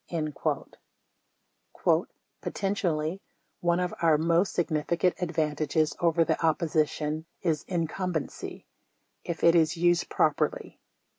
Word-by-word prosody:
33 155 Hz, -4 st, -2 dB, 1.8 s
"Potentially, 185 Hz, -3 st, -1 dB, 0.4 s
one 175 Hz, 0 st, +2 dB
of 180 Hz, 0 st, -1 dB
our 160 Hz, -3 st, +5 dB
most 170 Hz, +4 st, +2 dB
significant 170 Hz, +2 st, +1 dB
advantages 155 Hz, -2 st, 0 dB
over 165 Hz, -1 st, +3 dB
the -, -, -1 dB
opposition 155 Hz, -1 st, 0 dB, 0.2 s
is 160 Hz, -4 st, 0 dB
incumbency 175 Hz, -1 st, -3 dB, 0.3 s
— -, -, -47 dB
if 170 Hz, -, -5 dB
it 170 Hz, -, +7 dB
is 165 Hz, 0 st, +3 dB
used 175 Hz, 0 st, +2 dB
proper -, -, +2 dB
ly." -, -, -11 dB
165 Hz, 105 wpm, -28 LUFS, 155-175 Hz, 1.8 s, it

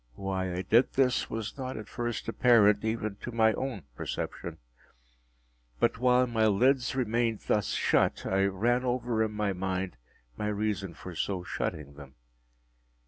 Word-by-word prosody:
Why 95 Hz, +1 st, -2 dB
I 90 Hz, +1 st, -3 dB
did 115 Hz, +7 st, +3 dB
this 130 Hz, -2 st, +2 dB
was 115 Hz, +4 st, -5 dB
not 130 Hz, -2 st, -4 dB
at 110 Hz, -1 st, -7 dB
first 120 Hz, -2 st, -4 dB
apparent 110 Hz, -3 st, +4 dB
even 110 Hz, -2 st, -2 dB
to 120 Hz, -, -7 dB
my 110 Hz, -1 st, +3 dB
own 125 Hz, -, -4 dB
perception. -, -, -5 dB, 1.2 s
But -, -, +1 dB
while 125 Hz, 0 st, +4 dB
my 115 Hz, -2 st, +2 dB
lids 125 Hz, +6 st, +2 dB
remained 115 Hz, -3 st, 0 dB
thus 105 Hz, -2 st, 0 dB
shut, -, -, +2 dB
I 95 Hz, +1 st, +2 dB
ran 115 Hz, +6 st, +1 dB
over 120 Hz, -2 st, 0 dB
in 110 Hz, -1 st, 0 dB
my 105 Hz, -2 st, 0 dB
mind 95 Hz, -4 st, -3 dB, 0.4 s
my 105 Hz, -, -2 dB
reason 100 Hz, -4 st, -2 dB
for 90 Hz, -, -9 dB
so 90 Hz, +2 st, -2 dB
shutting 75 Hz, -4 st, -4 dB
them. 70 Hz, -2 st, -13 dB
110 Hz, 150 wpm, -29 LUFS, 95-120 Hz, 1.2 s, apparent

